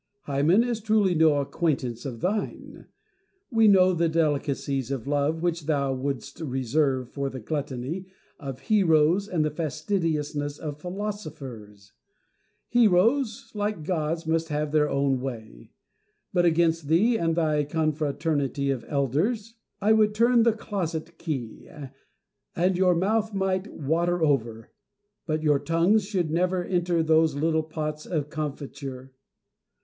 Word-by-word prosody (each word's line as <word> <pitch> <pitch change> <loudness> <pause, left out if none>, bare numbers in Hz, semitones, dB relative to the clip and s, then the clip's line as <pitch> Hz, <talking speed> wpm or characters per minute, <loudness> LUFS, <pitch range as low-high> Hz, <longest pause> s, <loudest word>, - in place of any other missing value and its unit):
Hymen 150 +8 +3
is 240 -2 -2
truly 215 -3 +2
no 160 -2 +4
acquaintance 135 -6 -2
of 120 -4 -7
thine. 205 +4 -3 0.6
We 225 -2 +5
know 185 -2 +6
the 170 -1 +1
delicacies 140 -4 0
of 135 -4 -3
love 145 +3 0
which 170 -3 -1
thou 140 -3 +1
wouldst 135 0 -4
reserve 130 -2 0
for 140 -1 -2
the 130 - -7
gluttony 145 - -4 0.3
of 135 -3 -7
heroes 180 -2 +3
and 165 -6 0
the 155 - -1
fastidiousness 150 -2 -2
of 150 -2 -6
philosophers. 145 - -7 0.8
Heroes, 225 +2 +2
like 205 -5 -2
gods, 165 0 -2
must 165 +1 0
have 150 0 -2
their 150 -1 +3
own 140 -1 +1
way; 110 - -7 0.6
but 175 -1 +3
against 165 -2 +2
thee 200 +10 +3
and 165 -3 0
thy 155 -3 +1
confraternity 145 -2 -1
of 130 -4 -3
elders 170 - -1 0.3
I 215 +2 +4
would 215 -1 +3
turn 235 +2 +4
the 230 -1 +4
closet 170 -6 -4
key, 130 -9 -5 0.9
and 180 +2 +2
your 180 -1 +3
mouths 210 +4 0
might 190 0 0
water 170 +4 0
over, 115 -7 0 0.6
but 155 -1 -1
your 150 -2 +3
tongues 170 +8 +2
should 180 -7 -1
never 180 +2 +1
enter 175 -2 +1
those 160 -1 +3
little 160 +2 +1
pots 155 -1 -5
of 150 -4 -2
comfiture. 140 -3 -6
160 Hz, 135 wpm, -26 LUFS, 140-185 Hz, 0.9 s, know